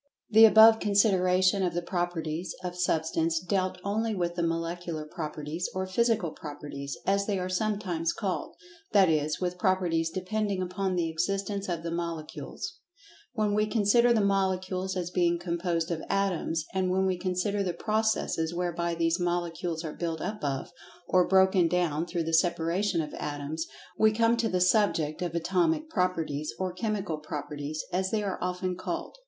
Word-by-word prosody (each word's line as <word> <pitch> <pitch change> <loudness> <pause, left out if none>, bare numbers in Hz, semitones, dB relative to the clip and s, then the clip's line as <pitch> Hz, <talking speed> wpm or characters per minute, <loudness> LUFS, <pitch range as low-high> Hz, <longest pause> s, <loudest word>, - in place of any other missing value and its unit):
The 220 +1 +9
above 220 +1 +8
consideration 190 -2 +3
of 175 -3 0
the 175 - 0
"Properties" 175 -2 -3
of 180 -1 -4
Substance 165 -1 +1
dealt 185 +1 -1
only 220 +2 -1
with 175 -2 -1
the 175 - -2
Molecular 165 -1 -2
Properties, 155 +1 -4
or 190 0 -1
Physical 215 -2 +1
Properties, 145 -2 -7
as 200 0 +1
they 205 -2 0
are 180 0 -2
sometimes 185 -4 -1
called—that 215 - -1
is, 155 -1 +1
with 180 0 -2
properties 175 -4 +1
depending 200 +2 -2
upon 185 +1 -2
the 170 -2 +1
existence 195 +4 -2
of 170 -2 -2
the 165 - -3
Molecules.[Pg 170 - -5 0.6
84] 215 -2 +1
When 205 - +1
we 210 +1 +2
consider 235 +2 +4
the 220 -4 +3
Molecules 190 -1 0
as 175 -1 -3
being 175 -1 +2
composed 170 -1 -2
of 160 -2 -2
Atoms, 180 -5 0
and 190 -1 +1
when 190 +1 +2
we 190 -1 +1
consider 185 +3 -1
the 185 -2 0
processes 215 -6 0
whereby 170 -1 -1
these 165 +1 +1
Molecules 175 -1 -2
are 155 -2 -5
built 165 -2 -3
up 210 +1 -4
of, 135 -2 -2 0.4
or 180 -1 +4
broken 190 -2 +4
down 170 -2 0
through 170 -2 -2
the 165 0 -3
separation 170 +2 +2
of 150 -1 -6
Atoms, 150 +3 -4 0.3
we 220 0 +6
come 230 +2 +3
to 230 -1 +1
the 180 0 0
subject 170 -6 +2
of 175 -2 -2
Atomic 190 - +1
Properties, 165 - -1
or 185 -1 -2
Chemical 195 -5 -2
Properties, 150 0 -5
as 185 +1 +1
they 215 0 0
are 195 -2 -3
often 180 0 -2
called. 185 - -5
180 Hz, 165 wpm, -28 LUFS, 165-195 Hz, 0.6 s, The